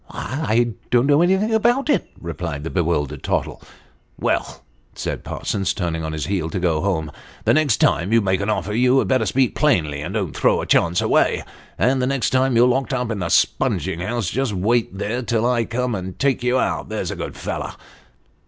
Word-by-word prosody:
" - - -32
I 120 -4 -1 0.2
don't 120 +1 +3
know 145 +2 +4
anything 190 +5 +2
about 240 +5 +2
it," 290 - +1
replied 85 -4 -5
the 80 - -5
bewildered 75 -5 -1
Tottle. - - -2 0.6
"Well," - - -1 0.3
said - - -4
Parsons, 100 -2 -2
turning 85 -3 -2
on 80 - -3
his 80 -2 -3
heel 90 -5 -1
to 95 - -3
go 80 -4 +1
home, 80 -6 -1 0.3
"the - - +4
next 150 -8 +3
time 90 +4 +2
you 115 - +5
make 95 -2 0
an 100 - -1
offer, 105 -1 -1
you 125 +3 +3
had - - +2
better 130 -5 +2
speak 130 +4 +2
plainly, 75 - +1
and 85 +8 -5
don't 95 -9 -2
throw - - +2
a - - -3
chance 85 +1 +2
away. - - +2 0.3
And 130 +2 +2
the 125 - +1
next 135 -3 0
time 130 -1 +2
you're 120 +2 +6
locked 130 +1 0
up 125 -2 -2
in 105 -3 -3
a 85 - -2
spunging 85 - +1
house, 110 0 -2
just 135 -4 -1
wait 105 +1 0
there 105 +5 -2
till 115 -2 0
I 120 -2 +1
come 125 +2 -2
and 95 -2 -5
take 135 -3 +1
you 125 +1 +1
out, - - -1
there's - - -3
a - - -4
good - - -6
fellow." - - -4
110 Hz, 210 wpm, -21 LUFS, 90-130 Hz, 0.6 s, you're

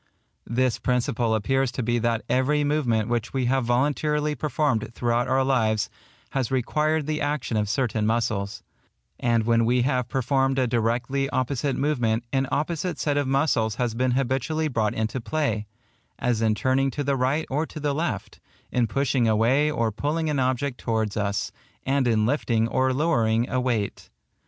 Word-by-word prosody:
This 120 -1 +1
principle 120 -1 0
appears 135 +4 +1
to 125 - -2
be 120 +1 +1
that 115 -1 0
every 145 +3 +2
movement 130 -8 +1
which 120 -1 -2
we 130 -2 0
have 130 0 +1
voluntarily 150 +4 +1
performed 140 -6 -1
throughout 120 0 0
our 130 +1 +2
lives 110 -5 +1 0.4
has 130 -4 -1
required 150 +4 0
the 155 0 -2
action 145 -5 -1
of 105 -1 0
certain 110 -4 0
muscles; 105 -3 -1 0.6
and 115 -2 +1
when 115 0 +3
we 120 +2 +2
have 125 -2 0
performed 135 +1 +1
a 130 - +3
directly 120 +3 0
opposite 135 +2 -1
movement, 120 -6 0
an 135 0 +1
opposite 170 +3 -1
set 145 -2 0
of 145 -1 +1
muscles 135 -6 +1
has 120 -3 -1
been 125 +2 +1
habitually 135 +4 0
brought 110 -7 0
into 110 +3 -2
play,—as 115 -2 -3
in 110 -1 +2
turning 130 +3 +1
to 145 +2 -3
the 140 0 +1
right 135 +5 0
or 150 +4 0
to - - -8
the 145 -1 0
left, 140 -9 -3 0.3
in 120 -2 +1
pushing 130 0 +1
away 120 +7 +3
or 115 -7 0
pulling 155 +7 -1
an 145 - 0
object 130 0 -1
towards 110 -3 -1
us, 100 -1 -1 0.3
and 135 -1 +1
in 110 -2 +2
lifting 115 -3 +1
or 130 +2 +1
lowering 120 -6 +1
a 130 -1 +1
weight. 115 -5 -2
125 Hz, 165 wpm, -25 LUFS, 115-140 Hz, 0.6 s, when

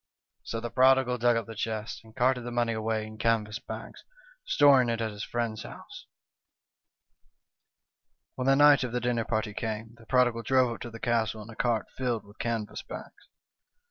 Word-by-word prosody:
" - - -55
So 115 - -2
the 120 +1 -5
prodigal 130 -1 +4
dug 120 0 +3
up 115 - -2
the 115 - -8
chests, 110 0 -4
and 110 0 -17
carted 125 0 +2
the 120 - -5
money 120 -1 0
away 110 0 -1
in 110 0 -11
canvas 115 -1 0
bags, - - -9 0.4
storing 135 - +5
it 115 0 -1
at 110 -1 -1
his 105 0 -7
friend's 115 -2 -2
house. - - -11 2.3
"When 130 0 -3
the 135 - +6
night 145 -1 +6
of 125 -2 -4
the 125 - +1
dinner 120 -1 0
party 110 -2 -1
came, 110 +1 -4
the 115 - -17
prodigal 125 -3 +3
drove 130 -1 +2
up - - -10
to 120 - -5
the 115 0 -10
castle 110 -2 0
in 110 - -11
a - - -12
cart 120 -2 0
filled 120 -4 -1
with 100 +1 -18
canvas 115 -3 -3
bags. - - -10
115 Hz, 190 wpm, -28 LUFS, 110-125 Hz, 2.3 s, the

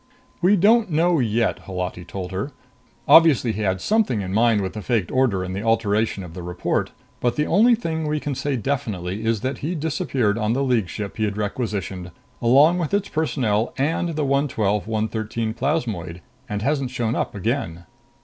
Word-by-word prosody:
"We 185 +4 +5
don't 215 +3 +4
know 165 +1 +2
yet," 115 -1 +1
Holati 90 -1 -4
told 90 0 -6
her. 100 +10 -4 0.5
"Obviously 155 -8 +6
he 110 - -4
had 95 -2 0
something 205 - +1
in 95 -1 -4
mind 115 -1 +3
with 95 -2 -3
the 110 - -5
faked 105 -3 -1
order 120 -8 +2
and 95 0 -4
the 100 - -3
alteration 110 -2 +1
of 85 -2 -10
the 90 - -7
report. 90 +1 -2 0.3
But 120 - 0
the 150 - +1
only 230 +9 +5
thing 160 -8 -3
we 150 0 0
can 145 -1 -3
say 140 +1 -2
definitely 110 -6 -3
is 115 -2 0
that 130 0 -3
he 165 +5 -3
disappeared 135 -8 0
on 105 +1 +1
the 135 +3 0
League 120 -8 +1
ship 105 +1 -6
he 110 - +1
had 105 -1 -3
requisitioned, 100 -4 -3 0.3
along 145 +9 +5
with 170 +2 0
its 200 -1 -1
personnel 125 -8 0
and 160 +4 0
the 150 -1 0
112 115 -8 0
113 110 0 -2
plasmoid, 115 - -2 0.3
and 105 0 -3
hasn't 140 -1 0
shown 120 -3 -1
up 120 - -2
again. 100 -5 -2
115 Hz, 185 wpm, -22 LUFS, 100-145 Hz, 0.5 s, Obviously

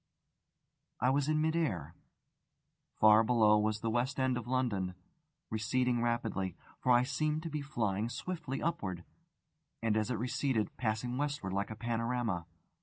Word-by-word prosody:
I 125 - +3
was 140 +2 +1
in 155 0 +2
mid 160 +1 +1
air. 90 - -1 1.1
Far 110 +1 +7
below 110 -2 +5
was 105 0 0
the 115 - 0
West 125 +4 0
End 130 -1 +2
of 120 -1 -4
London, 110 -8 0 0.6
receding 120 +3 +1
rapidly, 115 -6 -1 0.2
for 125 - +2
I 120 0 +6
seemed 150 +3 -1
to 165 - -5
be 150 0 -2
flying 115 -7 -1
swiftly 135 +1 -4
upward, 95 - -2 0.8
and 115 -2 +1
as 110 +1 +1
it 125 - 0
receded, 120 0 -1
passing 120 +2 -1
westward 145 -10 -2
like 100 +1 -1
a 110 - -5
panorama. 115 -5 -1
120 Hz, 150 wpm, -33 LUFS, 105-130 Hz, 1.1 s, Far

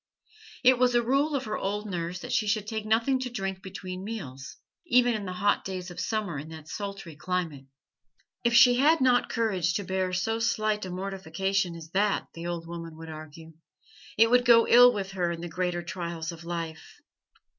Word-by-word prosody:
It 255 -1 +6
was 250 -1 +3
a 240 - +4
rule 280 +5 +1
of 270 - -1
her 215 0 -3
old 205 +2 -2
nurse 175 -2 -3
that - - -7
she 215 - +1
should 210 0 0
take 215 0 -4
nothing 230 +5 +2
to 255 -1 -3
drink 195 -5 -4
between 185 -1 -7
meals, 140 - -7 0.3
even 245 0 +4
in 210 -2 -3
the 180 - -4
hot 200 +3 +1
days 185 -1 -5
of 175 - -8
summer 190 -4 -2
in 155 +3 -8
that 160 -1 -10
sultry 195 -3 -6
climate. 160 -3 -3 0.8
If 235 0 +2
she 245 0 +7
had 310 +5 +4
not 250 -2 +3
courage 190 -7 0
to 200 - -1
bear 185 0 -1
so 205 +5 -1
slight 215 -2 0
a - - -6
mortification 190 0 -2
as 165 -1 -10
that, 200 +2 +1
the 165 +1 -6
old 170 -1 -4
woman 165 -1 -8
would 165 0 -9
argue, 155 +1 -10 0.6
it 225 +2 +5
would 245 0 +5
go 235 -2 +6
ill 245 +1 +8
with 195 -4 -4
her 180 -3 -1
in 170 -1 -5
the 175 - -5
greater 175 +1 -2
trials 170 -1 -4
of 170 0 -11
life. 165 -2 -6
190 Hz, 200 wpm, -27 LUFS, 170-225 Hz, 0.8 s, ill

